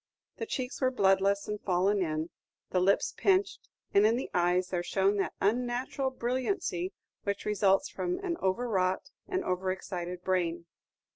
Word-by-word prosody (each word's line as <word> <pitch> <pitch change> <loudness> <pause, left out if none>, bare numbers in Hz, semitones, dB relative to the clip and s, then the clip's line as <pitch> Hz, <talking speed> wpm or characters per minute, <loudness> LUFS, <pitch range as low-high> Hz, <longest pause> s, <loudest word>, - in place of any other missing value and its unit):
The 455 - -4
cheeks 255 -7 -4
were 260 - +4
bloodless 200 -3 +2
and 210 0 -4
fallen 190 +2 +2
iq, 160 -2 -1 0.4
the 185 - +2
lips 195 +2 +2
pinched, 390 0 +1 0.2
and 200 - +6
in 220 +2 +5
the 255 - -4
eyes 180 +1 +2
there 175 -2 -1
shone 195 +3 +1
that 195 - -1
unnatural 245 +5 0
brilliancy 250 - -1 0.3
which 200 0 -3
results 210 +4 +3
from 360 0 -2
an 345 -2 0
over 195 +6 0
wrought 185 -4 0 0.2
and 380 -1 -1
over 185 - 0
excited 180 -1 -5
brain. 175 -2 0
200 Hz, 155 wpm, -30 LUFS, 185-250 Hz, 0.4 s, and